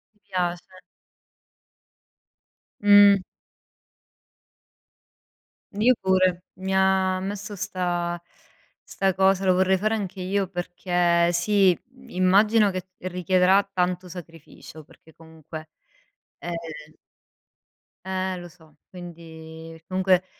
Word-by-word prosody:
Ti -, -, -35 dB
piace. 175 Hz, -2 st, -2 dB, 2.2 s
Mh. 205 Hz, -1 st, +7 dB, 2.6 s
Io 220 Hz, +5 st, +4 dB
pure, 185 Hz, -2 st, +2 dB
mi 190 Hz, +1 st, -4 dB
ha 190 Hz, -1 st, +2 dB
messo 205 Hz, +2 st, -5 dB
'sta 175 Hz, -3 st, -3 dB, 0.6 s
'sta 195 Hz, -1 st, -1 dB
cosa, 190 Hz, 0 st, +2 dB
lo 185 Hz, -, +4 dB
vorrei 190 Hz, +1 st, +3 dB
fare 215 Hz, +4 st, 0 dB
anche 195 Hz, -3 st, -5 dB
io 195 Hz, +1 st, -1 dB
perché 175 Hz, -1 st, 0 dB
sì, 185 Hz, +1 st, +3 dB, 0.3 s
immagino 205 Hz, +3 st, +3 dB
che 185 Hz, -1 st, -4 dB, 0.2 s
richiederà 185 Hz, +2 st, +2 dB
tanto 180 Hz, 0 st, -1 dB
sacrificio, 165 Hz, -2 st, -12 dB
perché 160 Hz, +2 st, -21 dB
comunque. 160 Hz, -1 st, -11 dB, 0.7 s
Ehm 175 Hz, -, -6 dB, 1.6 s
Eh, 190 Hz, 0 st, -2 dB
lo 175 Hz, -, -9 dB
so! 160 Hz, -3 st, -22 dB
Quindi 165 Hz, -2 st, -11 dB
comunque 185 Hz, 0 st, +2 dB
185 Hz, 90 wpm, -24 LUFS, 175-190 Hz, 2.6 s, Mh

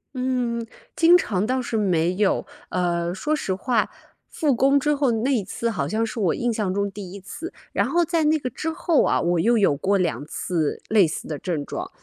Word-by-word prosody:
嗯， 250 Hz, -2 st, -1 dB, 0.3 s
经 340 Hz, +2 st, +7 dB
常 205 Hz, -, -1 dB
倒 255 Hz, +1 st, 0 dB
是 230 Hz, -2 st, -2 dB
没 180 Hz, -3 st, +1 dB
有。 205 Hz, -1 st, +1 dB, 0.2 s
呃， 175 Hz, -1 st, 0 dB
说 300 Hz, +11 st, -1 dB
实 195 Hz, -10 st, -1 dB
话， 230 Hz, +2 st, 0 dB, 0.4 s
复 295 Hz, -4 st, +1 dB
工 275 Hz, +4 st, +4 dB
之 295 Hz, +1 st, +2 dB
后 280 Hz, -3 st, +1 dB
那 235 Hz, +5 st, +1 dB
一 235 Hz, -, +2 dB
次， 235 Hz, +5 st, -3 dB
好 225 Hz, -, -2 dB
像 225 Hz, +1 st, 0 dB
是 225 Hz, +1 st, -5 dB
我 185 Hz, -6 st, +2 dB
印 240 Hz, -1 st, 0 dB
象 205 Hz, -4 st, -1 dB
中 200 Hz, 0 st, -1 dB
第 195 Hz, -2 st, -8 dB
一 200 Hz, -, -7 dB
次， 330 Hz, -, -8 dB, 0.2 s
然 -, -, +1 dB
后 345 Hz, 0 st, +2 dB
在 330 Hz, -1 st, +1 dB
那 310 Hz, +1 st, +4 dB
个 255 Hz, -4 st, -4 dB
之 310 Hz, +7 st, -4 dB
后 320 Hz, -1 st, +2 dB
啊， -, -, +2 dB
我 175 Hz, 0 st, +1 dB
又 235 Hz, +6 st, +3 dB
有 195 Hz, -9 st, +4 dB
过 195 Hz, +8 st, +1 dB
2 170 Hz, -5 st, -1 dB
次 160 Hz, -1 st, -2 dB
类 210 Hz, -5 st, +5 dB
似 155 Hz, -, -6 dB
的 150 Hz, -2 st, -4 dB
症 160 Hz, -6 st, -3 dB
状。 -, -, -5 dB
220 Hz, 230 characters per minute, -23 LUFS, 185-260 Hz, 0.4 s, 经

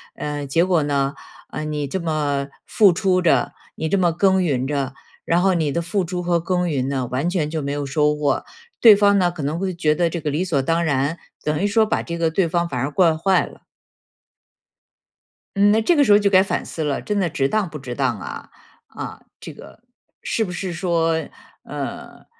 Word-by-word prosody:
嗯， 145 Hz, -1 st, -4 dB
结 165 Hz, +5 st, +2 dB
果 180 Hz, -4 st, +2 dB
呢， 140 Hz, -1 st, 0 dB, 0.4 s
呃， 155 Hz, -, -5 dB
你 150 Hz, -2 st, -3 dB
这 190 Hz, +7 st, -3 dB
么 145 Hz, -4 st, -1 dB, 0.2 s
付 200 Hz, -5 st, +4 dB
出 185 Hz, 0 st, +1 dB
着， 170 Hz, -, +2 dB, 0.2 s
你 160 Hz, -, -3 dB
这 200 Hz, -, +2 dB
么 175 Hz, -3 st, +2 dB
耕 190 Hz, +1 st, +3 dB
耘 130 Hz, -6 st, 0 dB
着， 140 Hz, -2 st, -2 dB, 0.3 s
然 170 Hz, +1 st, +2 dB
后 190 Hz, 0 st, +3 dB
你 155 Hz, -4 st, 0 dB
的 170 Hz, -, 0 dB
付 185 Hz, +3 st, -1 dB
出 180 Hz, +1 st, -4 dB
和 170 Hz, -1 st, +1 dB
耕 180 Hz, 0 st, -1 dB
耘 135 Hz, -3 st, -1 dB
呢， 135 Hz, -2 st, -1 dB
完 135 Hz, +8 st, -1 dB
全 165 Hz, -5 st, -1 dB
就 160 Hz, -1 st, -3 dB
没 140 Hz, 0 st, -3 dB
有 145 Hz, -1 st, -3 dB
收 150 Hz, +2 st, +1 dB
获。 145 Hz, -2 st, -1 dB, 0.4 s
对 220 Hz, -3 st, +9 dB
方 200 Hz, 0 st, +4 dB
呢， 175 Hz, -2 st, +2 dB
可 170 Hz, -3 st, -8 dB
能 150 Hz, +4 st, -2 dB
会 190 Hz, 0 st, -2 dB
觉 155 Hz, -3 st, +1 dB
得 175 Hz, 0 st, +2 dB
这 170 Hz, -, -4 dB
个 150 Hz, -, -2 dB
理 155 Hz, +6 st, -1 dB
所 150 Hz, -7 st, 0 dB
当 165 Hz, +5 st, 0 dB
然， 145 Hz, +3 st, 0 dB, 0.3 s
等 150 Hz, 0 st, -1 dB
于 -, -, +1 dB
说 220 Hz, +2 st, +3 dB
把 -, -, -1 dB
这 170 Hz, -, -5 dB
个 165 Hz, -1 st, +1 dB
对 170 Hz, +1 st, +1 dB
方 170 Hz, +1 st, 0 dB
反 125 Hz, -, -3 dB
而 140 Hz, +3 st, -2 dB
惯 165 Hz, -2 st, +3 dB
坏 190 Hz, +3 st, +2 dB
了。 -, -, -15 dB, 1.9 s
嗯， 205 Hz, +1 st, +4 dB
那 220 Hz, +1 st, +3 dB
这 340 Hz, +9 st, +3 dB
个 290 Hz, -, +5 dB
时 210 Hz, -, +2 dB
候 205 Hz, -, +7 dB
就 200 Hz, -1 st, +2 dB
该 190 Hz, -1 st, +5 dB
反 -, -, -3 dB
思 160 Hz, -, -5 dB
了， 145 Hz, -2 st, -1 dB
真 205 Hz, -1 st, -2 dB
的 175 Hz, -3 st, 0 dB
值 135 Hz, -2 st, 0 dB
当 210 Hz, -5 st, 0 dB
不 150 Hz, -, -8 dB
值 125 Hz, -2 st, -7 dB
当 125 Hz, -7 st, -1 dB
啊？ -, -, -8 dB, 0.4 s
啊， -, -, -8 dB, 0.2 s
这 -, -, -9 dB
个 -, -, -14 dB, 0.4 s
是 225 Hz, -, -1 dB
不 180 Hz, -, -5 dB
是 180 Hz, +1 st, -4 dB
说， 165 Hz, -1 st, 0 dB, 0.5 s
呃， -, -, -7 dB
165 Hz, 235 characters per minute, -21 LUFS, 145-185 Hz, 1.9 s, 对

